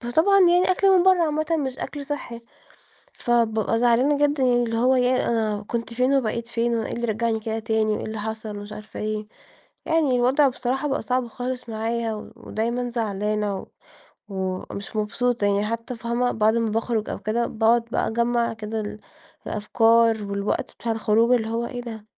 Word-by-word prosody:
فطبعًا 320 +12 +3
يعني 360 0 +5
أكل 390 +1 +3
من - - +4
برّه 370 -1 +5
عامةً 310 -1 0
مش 265 -3 -3
أكل 280 0 -6
صحّي، 255 -5 -5 0.7
فبابقى 225 -2 +1
زعلانة 245 +5 +3
جدًا 290 -1 -1
اللي 240 -2 +2
هو 250 +3 +3
"ياه، 255 0 +2
أنا 215 -3 0
كنت 235 -1 -3
فين 255 +3 +2
وبقيت 235 -3 0
فين؟ 235 0 0
وأنا 225 -1 -1
إيه - - -6
اللي 235 - -3
رجعني 225 0 0
كده 220 0 -3
تاني؟ 220 -1 0
وإيه 210 - -3
اللي 220 0 -5
حصل؟ 220 0 -5
ومش 205 +1 -8
عارفة 210 0 -9
إيه." 215 0 -3 0.6
يعني 320 -6 +2
الوضع 260 +4 +4
بصراحة 260 +2 -2
بقى 275 - -1
صعب 250 -1 -1
خالص 250 0 -5
معايا، 225 0 -3
ودايمًا 235 +3 -3
زعلانة 210 -3 -1
و - - -9 0.6
ومش 190 +1 -5
مبسوطة 230 +1 0
يعني 200 +1 +1
حتّى 230 +3 -4
فاهمة؟ 235 +2 -1
بعد 220 0 +2
ما 230 -1 +1
باخرج 225 0 -1
أو - - -4
كده 235 +2 0
باقعد 230 +1 +2
بقى - - 0
أجمع 235 +1 +1
كده 220 0 -5
ال 210 0 -6 0.5
الأفكار 225 +1 +3
والوقت 200 0 -2
بتاع 230 - -3
الخروج 225 +2 +2
اللي 225 -2 +1
هو 230 +1 -1
"إيه 245 0 -5
ده، 220 -3 -8
230 Hz, 175 wpm, -24 LUFS, 220-250 Hz, 0.7 s, يعني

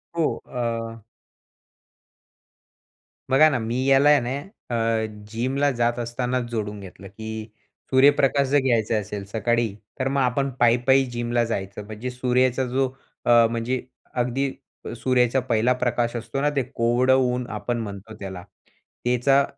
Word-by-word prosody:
हो, 165 -2 +1
अ 115 -2 -4 2.3
बघा 135 +4 +6
ना, 130 -4 0
मी 120 +3 -2
याला 135 +1 +5
आहे 150 -1 +6
ना 125 +3 -3 0.4
अ, 115 -1 +1 0.3
जिमला 130 +5 0
जात 120 -1 0
असतानाच 125 +2 -2
जोडून 105 -2 -3
घेतलं, 95 0 -11
की 110 +2 -7 0.5
सूर्यप्रकाश 140 +1 +4
जर 145 +2 +3
घ्यायचा 115 -3 +2
असेल 105 -1 -4
सकाळी 115 +1 0 0.3
तर 130 - 0
मग 140 +1 0
आपण 135 +2 +1
पायी-पायी 125 +3 +4
जिमला 120 0 0
जायचं. 100 -2 -4
म्हणजे 110 +4 -6
सूर्याचा 125 +1 +1
जो 130 +2 +1 0.4
अ, 120 -1 +6
म्हणजे 120 +2 -1 0.3
अगदी 125 +2 0 0.5
सूर्याचा 125 +1 +2
पहिला 125 -1 +2
प्रकाश 120 -1 0
असतो 115 +3 -3
ना 145 - +3
ते 140 - +3
कोवळ 120 +2 +2
ऊन 125 -1 +2
आपण 120 -1 -2
म्हणतो 105 -1 -7
त्याला. 95 -2 -7 0.6
त्याचा 125 +3 +3
120 Hz, 135 wpm, -24 LUFS, 115-130 Hz, 2.3 s, बघा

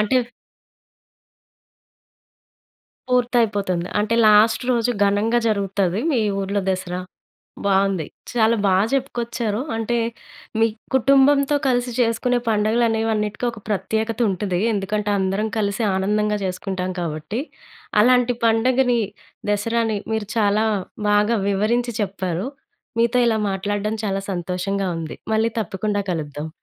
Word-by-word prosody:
అంటే 210 +5 +2 2.9
పూర్తయిపోతుంది. 215 -8 +1
అంటే 215 +2 +1
లాస్ట్ 215 +3 +5
రోజు 235 0 +1 0.2
ఘనంగా 215 +4 +2
జరుగుతది 195 -2 0
మీ 240 - +2 0.2
ఊర్లో 200 +1 -1
దసరా. 185 -1 -3 0.7
బావుంది. 195 -3 +2 0.3
చాలా 230 -1 +3
బా 195 - +4 0.2
చెప్పుకొచ్చారు. 235 -4 -1
అంటే, 225 +1 -1 0.6
మీ 225 - +5 0.3
కుటుంబంతో 275 +2 +4
కలిసి 245 -1 +1
చేసుకునే 245 +1 +1
పండుగలనేవి 225 +1 +2
అన్నిటికొక 210 +2 -2
ప్రత్యేకతుంటది. 215 -2 -1
ఎందుకంటే, 205 +1 -1
అందరం 195 +3 0
కలిసి 200 +1 -1
ఆనందంగా 210 +2 +1
చేసుకుంటాం 185 0 -3
కాబట్టి. 165 +7 -3 0.6
అలాంటి 245 +1 +4
పండగని 245 +2 +3 0.5
దసరాని 220 +1 0
మీరు 220 -2 -2
చాలా 210 0 +3 0.5
బాగా 210 +3 +3
వివరించి 235 +4 0
చెప్పారు. 190 +1 -2 0.5
మీతో 235 +2 +3
ఇలా 220 -1 +1
మాట్లాడడం 205 +2 -2
చాలా 195 -1 -1
సంతోషంగా 185 +2 -2
ఉంది. 160 -1 -6 0.2
మళ్ళీ 225 +1 +2
తప్పకుండా 205 +1 -2
కలుద్దాం. 150 -2 -4
210 Hz, 100 wpm, -21 LUFS, 195-235 Hz, 2.9 s, లాస్ట్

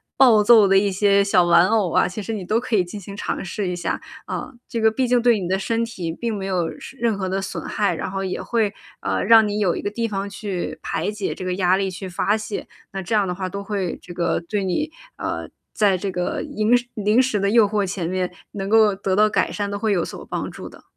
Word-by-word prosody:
暴 235 -5 +6
揍 220 -2 +7
的 195 0 +5
一 200 +1 +2
些 200 +1 +3
小 195 -3 +4
玩 175 +1 +5
偶 210 -5 +1
啊， - - +3
其 185 +4 -5
实 225 +3 -4
你 200 -4 -4
都 215 +5 +1
可 245 -1 -1
以 190 - +4
进 180 +4 -8
行 200 +1 -9
尝 - - -3
试 195 +1 -3
一 180 - -2
下。 175 -1 -2 0.3
啊， - - -5 0.2
这 230 - -2
个 220 0 +5
毕 255 +3 0
竟 245 0 +3
对 240 -3 +4
你 180 - -3
的 190 +2 +1
身 230 +4 -1
体 180 -8 -5
并 225 +6 -3
没 195 - -4
有 180 -4 -1
什 - - -10
任 230 -3 +1
何 190 -1 -2
的 190 +1 -1
损 195 - -5
害， 205 -2 0
然 - - -4
后 195 0 -3
也 185 - -3
会， 220 -3 0 0.3
呃， - - -1
让 225 +1 +7
你 205 0 -2
有 190 -5 +2
一 - - -4
个 - - -2
地 230 +2 -2
方 200 -2 -3
去 195 -3 -4
排 - - -2
解 210 -2 -3
这 - - -8
个 185 0 -1
压 185 -1 +3
力， 195 0 0
去 185 +1 -7
发 195 +4 0
泄， 215 -1 -5 0.2
那 195 - -4
这 190 +5 -1
样 205 -2 +2
的 180 - -1
话 185 0 -4
都 200 +1 -5
会 195 -4 -3
这 175 - -10
个 170 -1 0
对 195 +4 -3
你 190 - -1 0.3
呃， - - -4 0.2
在 200 -3 +3
这 195 +2 -3
个 180 -1 -2
银 215 +3 +2
时 245 - -5
零 210 +3 +3
食 255 -5 0
的 200 0 +1
诱 220 0 +5
惑 205 0 0
前 180 -3 -3
面 185 -1 -1 0.2
能 195 -1 -4
够 215 -1 +5
得 195 -1 -1
到 210 +2 +5
改 - - +1
善， 205 -1 -3
都 200 - -3
会 220 0 0
有 180 -4 +1
所 - - -8
帮 - - -4
助 - - -9
的。 - - -16
200 Hz, 285 characters per minute, -22 LUFS, 185-215 Hz, 0.3 s, 揍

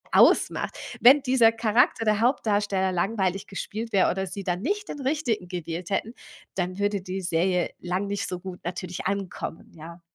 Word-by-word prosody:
ausmacht. - - +4 0.2
Wenn 270 +4 +8
dieser 250 -4 +5
Charakter, 230 +2 +2
der 210 -1 +2
Hauptdarsteller, 205 -6 +1
langweilig 195 +1 -1
gespielt 220 +3 -5
wäre 190 - +4
oder 190 +1 -2
sie 195 +2 -6
dann 180 0 -2
nicht 410 - -2
den 290 - -6
Richtigen 260 - -1
gewählt 175 0 -5
hätten, 220 +4 -1 0.4
dann 185 0 -2
würde 205 -1 0
die 185 +1 -4
Serie 175 +1 +1
lang 180 +3 -2
nicht 200 0 -2
so 180 - -4
gut 180 0 -8
natürlich 180 +1 -4
ankommen, 195 -4 -4
ja. 170 +2 -11
195 Hz, 165 wpm, -26 LUFS, 180-225 Hz, 0.4 s, Wenn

